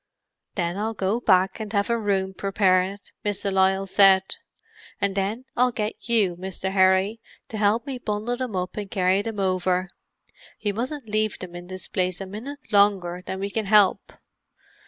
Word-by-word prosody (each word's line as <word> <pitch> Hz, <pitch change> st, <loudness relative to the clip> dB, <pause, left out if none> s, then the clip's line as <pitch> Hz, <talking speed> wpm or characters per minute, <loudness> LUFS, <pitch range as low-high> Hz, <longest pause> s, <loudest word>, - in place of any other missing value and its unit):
"Then 175 Hz, -1 st, -1 dB
I'll 220 Hz, +1 st, -2 dB
go 195 Hz, +4 st, 0 dB
back 190 Hz, -4 st, +3 dB
and 215 Hz, -2 st, -5 dB
have 200 Hz, +2 st, +1 dB
a -, -, +3 dB
room 195 Hz, -4 st, 0 dB
prepared," 195 Hz, 0 st, +1 dB
Miss 205 Hz, -2 st, -2 dB
de 200 Hz, -, 0 dB
Lisle 190 Hz, 0 st, +2 dB
said; 195 Hz, -1 st, +6 dB, 0.8 s
"and 200 Hz, -1 st, 0 dB
then 205 Hz, +6 st, -2 dB
I'll 250 Hz, +1 st, +3 dB
get 215 Hz, +1 st, -4 dB
you, 205 Hz, -7 st, +3 dB
Mr. 190 Hz, +1 st, -4 dB
Harry, 190 Hz, +3 st, +3 dB, 0.3 s
to 220 Hz, -, -5 dB
help 215 Hz, +4 st, +2 dB
me 270 Hz, -3 st, -5 dB
bundle 215 Hz, +2 st, -2 dB
them 245 Hz, -4 st, -4 dB
up 180 Hz, +1 st, -3 dB
and 205 Hz, -2 st, -4 dB
carry 185 Hz, +1 st, +2 dB
them 220 Hz, -1 st, -5 dB
over. 185 Hz, -1 st, 0 dB, 0.7 s
We 205 Hz, -, +2 dB
mustn't 255 Hz, +4 st, -4 dB
leave 215 Hz, 0 st, 0 dB
them 180 Hz, -2 st, -9 dB
in 175 Hz, 0 st, -8 dB
this 185 Hz, 0 st, -7 dB
place 185 Hz, -2 st, -1 dB
a 195 Hz, -, -5 dB
minute 225 Hz, +9 st, -7 dB
longer 195 Hz, -4 st, +3 dB
than 190 Hz, -, -5 dB
we 200 Hz, +1 st, -3 dB
can 220 Hz, 0 st, -2 dB
help. 205 Hz, -2 st, +4 dB
200 Hz, 175 wpm, -24 LUFS, 190-215 Hz, 0.8 s, said